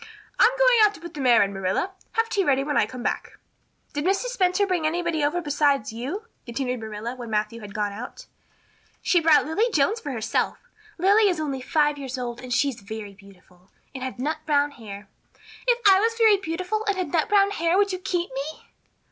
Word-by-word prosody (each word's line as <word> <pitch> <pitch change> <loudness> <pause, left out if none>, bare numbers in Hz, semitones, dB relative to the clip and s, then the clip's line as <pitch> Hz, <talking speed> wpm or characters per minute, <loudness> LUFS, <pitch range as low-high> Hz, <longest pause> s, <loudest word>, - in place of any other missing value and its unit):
"I'm 465 - +7
going - - +5
out 420 -1 +5
to - - -12
put 340 0 -10
the 290 - -5
mare 245 -4 +5
in, 200 0 -3
Marilla. 195 - -1 0.2
Have 455 0 +1
tea 405 -3 0
ready 275 -4 +2
when 295 +1 -2
I - - +3
come 250 -2 -8
back." - - -3 0.6
"Did 290 0 -2
Mrs. 390 +8 +1
Spencer 405 -4 +2
bring 355 -5 0
anybody 335 -1 -1
over 320 +5 +1
besides 285 -6 +1
you?" 285 - -5 0.2
continued 250 +1 -3
Marilla 220 +2 -5
when 240 -2 -8
Matthew 215 +1 -2
had 205 -1 -10
gone 210 -1 -1
out. 245 - -8 0.8
"She 355 - +3
brought 320 -2 +4
Lily 410 +11 +1
Jones 405 +8 +2
for 290 - -5
herself. 225 -4 -1 0.4
Lily 400 +4 +4
is 350 -4 -1
only 275 -4 -3
five 295 +1 +1
years 265 -1 -5
old 245 -1 -5
and 250 0 -9
she 280 +4 +2
is 240 -5 -8
very 210 0 -7
beautiful 190 -2 -20 0.2
and 260 -1 -6
had 260 -1 -5
nut 305 +5 -2
brown 290 -1 +2
hair. 210 -5 -10 0.6
If 485 -1 +3
I 385 -1 +7
was 455 +2 0
very 440 -3 +5
beautiful 370 +4 -3
and 400 -1 +1
had 365 -1 -3
nut 325 -2 +1
brown 400 -1 +4
hair 335 -2 +1
would 400 -1 +2
you 370 - -3
keep 355 -2 -2
me?" 280 +4 -6
295 Hz, 210 wpm, -24 LUFS, 240-380 Hz, 0.8 s, I'm